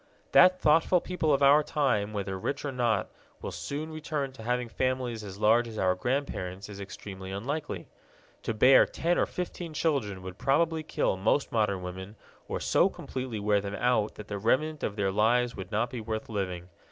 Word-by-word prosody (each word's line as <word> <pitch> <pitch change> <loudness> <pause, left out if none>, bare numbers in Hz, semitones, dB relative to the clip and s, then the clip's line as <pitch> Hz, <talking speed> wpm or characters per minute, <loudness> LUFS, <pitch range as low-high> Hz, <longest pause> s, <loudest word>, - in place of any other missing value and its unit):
That 185 0 +7
thoughtful 165 +4 +4
people 170 -3 -1
of 140 0 +3
our 140 +2 +7
time, 130 -9 0
whether 100 -2 -3
rich 140 - -3
or 145 - -2
not, 120 -6 0 0.3
will - - -5
soon 155 +3 -5
return 150 -3 -3
to 130 -3 -12
having 125 +1 -1
families 125 -1 -2
as 100 -2 -8
large 115 +3 +4
as 110 -1 -8
our 95 -2 +3
grandparents' 100 -4 -3
is 100 -1 -8
extremely 95 -1 -8
unlikely. 115 - -4 0.5
To 115 - -3
bear 130 +5 +7
ten 175 +2 0
or - - +2
fifteen 175 -2 -5
children 110 - -1
would 95 +1 -8
probably 160 +5 +2
kill 150 -9 -1
most 110 +9 +1
modern 105 -5 0
women 95 +3 -7 0.3
or - - -3
so - - +3
completely 130 -4 -5
wear 105 0 +2
them 100 0 -5
out 120 -3 +1
that 105 - -9
the 100 -1 -4
remnant 150 +8 +1
of 100 - -2
their 100 -2 0
lives 120 +4 +2
would 95 +1 -8
not 115 +3 0
be 125 - -5
worth 110 0 -4
living. 90 -4 -3
115 Hz, 190 wpm, -29 LUFS, 100-140 Hz, 0.5 s, That